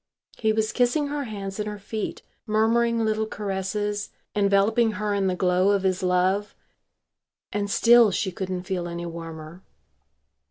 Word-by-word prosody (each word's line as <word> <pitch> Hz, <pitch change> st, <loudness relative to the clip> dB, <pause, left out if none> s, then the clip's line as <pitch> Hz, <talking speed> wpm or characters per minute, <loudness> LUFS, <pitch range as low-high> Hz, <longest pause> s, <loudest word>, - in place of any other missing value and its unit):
He 220 Hz, -1 st, +1 dB
was 220 Hz, 0 st, 0 dB
kissing 270 Hz, +4 st, +1 dB
her 290 Hz, -1 st, -3 dB
hands 200 Hz, -3 st, -6 dB
and 210 Hz, 0 st, -2 dB
her 210 Hz, -, -6 dB
feet, 210 Hz, +1 st, -5 dB, 0.2 s
murmuring 230 Hz, +1 st, +2 dB
little 220 Hz, 0 st, 0 dB
caresses, 205 Hz, 0 st, -3 dB, 0.2 s
enveloping 210 Hz, +3 st, +3 dB
her 210 Hz, 0 st, -2 dB
in 200 Hz, -1 st, +1 dB
the 185 Hz, -, 0 dB
glow 180 Hz, +1 st, +2 dB
of 200 Hz, -1 st, +2 dB
his 185 Hz, 0 st, +1 dB
love. 185 Hz, +3 st, +1 dB, 1.0 s
And 205 Hz, -1 st, -1 dB
still 235 Hz, +2 st, +6 dB
she 195 Hz, 0 st, -1 dB
couldn't 185 Hz, 0 st, -4 dB
feel 180 Hz, -2 st, -3 dB
any 170 Hz, 0 st, -5 dB
warmer. 165 Hz, 0 st, -8 dB
205 Hz, 150 wpm, -25 LUFS, 185-220 Hz, 1.0 s, still